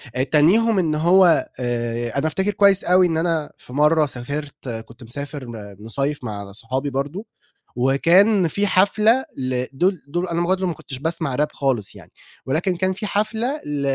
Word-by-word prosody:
آآ، 130 - +1
تانيهم 190 +10 +3
إن 160 -4 0
هو 175 +2 +4
آآ، 120 0 -2
أنا 150 - +1
أفتكر 190 +6 0
كويّس 200 -1 +4
أوي 180 +1 +4
إن 160 -2 -1
أنا 165 -2 -1
في 125 - -13
مرّه 150 +2 +4
سافرت 140 +2 -6
كُنت 115 +1 -8
مسافر 140 +4 -6
م 105 -4 -9
مِصيّف 135 +6 -3
مع 100 -3 -6
صحابي 130 +7 -3
برضو، 145 - -4 0.5
وكان 170 - +4
في 200 +6 0
حفلة 215 +7 +3
لدُول 135 +8 -1
دول 175 +5 -2
أنا 170 0 -1
برضو 185 +1 0
ما 170 - -1
كُنتش 135 -3 -8
باسمع 160 -3 -2
راب 150 +2 0
خالص 130 -7 -2
يعني، - - -15 0.3
ولكن 175 +7 0
كان 185 +2 0
في 210 +3 -5
حفلة 220 +8 -1
ل 145 -1 -3
150 Hz, 170 wpm, -21 LUFS, 130-185 Hz, 0.5 s, هو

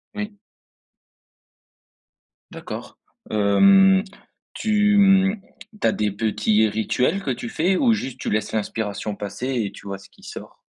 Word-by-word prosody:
Oui. 210 0 -5 2.1
D'accord. - - -8 0.3
Hem, 190 - +5 0.5
tu, 210 -1 +2
hem, 195 0 +4 0.4
tu - - +3
as - - +3
des 105 -1 -1
petits 105 +1 +1
rituels 125 - 0
que 135 - -1
tu 120 -1 -5
fais, 185 +4 +1
ou 240 -4 +3
juste 135 - -4
tu - - -3
laisses 110 0 -1
l'inspiration 105 -1 -3
passer 105 +5 -5 0.2
et 100 - -5
tu 100 - -13
vois 100 0 -4
ce 100 - -17
qui - - -23
sort? - - -10
125 Hz, 140 wpm, -22 LUFS, -, 2.1 s, Hem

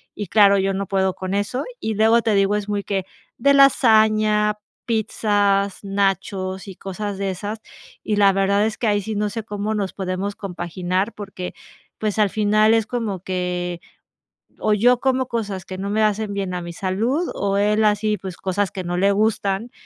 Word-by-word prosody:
Y 205 -3 -5
claro, 200 0 +5
yo 195 0 +1
no 195 -1 -3
puedo 190 -1 +1
con 185 0 -4
eso. 205 +6 -1 0.2
Y 220 -1 -2
luego 225 +2 +4
te 220 -1 +1
digo, 195 +1 +3
es 210 0 -3
muy 205 -1 -1
que 195 -2 -1 0.3
de 280 +4 +4
lasaña, 215 -5 +4 0.3
pizzas, 205 -3 +1
nachos 195 -1 -1
y 185 - -9
cosas 195 +1 -5
de 195 -1 -2
esas, 205 +4 -5 0.4
y 210 - 0
la 200 -1 +5
verdad 200 +2 +2
es 220 - -2
que 230 - -1
ahí 205 -1 +2
sí 215 +1 -4
no 210 0 0
sé 225 0 -5
cómo 210 0 -3
nos 200 -2 -2
podemos 190 +1 -3
compaginar 185 +2 -2
porque, 195 -3 -7 0.4
pues, 215 0 -2
al 205 -2 +4
final 215 +1 +3
es 225 -2 +2
como 225 -6 -3
que, 180 -1 -3 0.8
o 215 - +2
yo 245 +4 +4
como 260 -1 +1
cosas 205 -6 -3
que 185 - -7
no 200 +1 -4
me 215 +1 +1
hacen 210 -1 0
bien 195 -2 -3
a 180 - -3
mi 170 0 -7
salud 225 - -1
o 200 0 -1
él, 210 +1 +2
así, 210 0 +1
pues 185 -1 -7
cosas 195 +1 -1
que 185 - -5
no 175 0 -3
le 200 +2 +3
gustan 210 +1 0
205 Hz, 190 wpm, -21 LUFS, 190-215 Hz, 0.8 s, claro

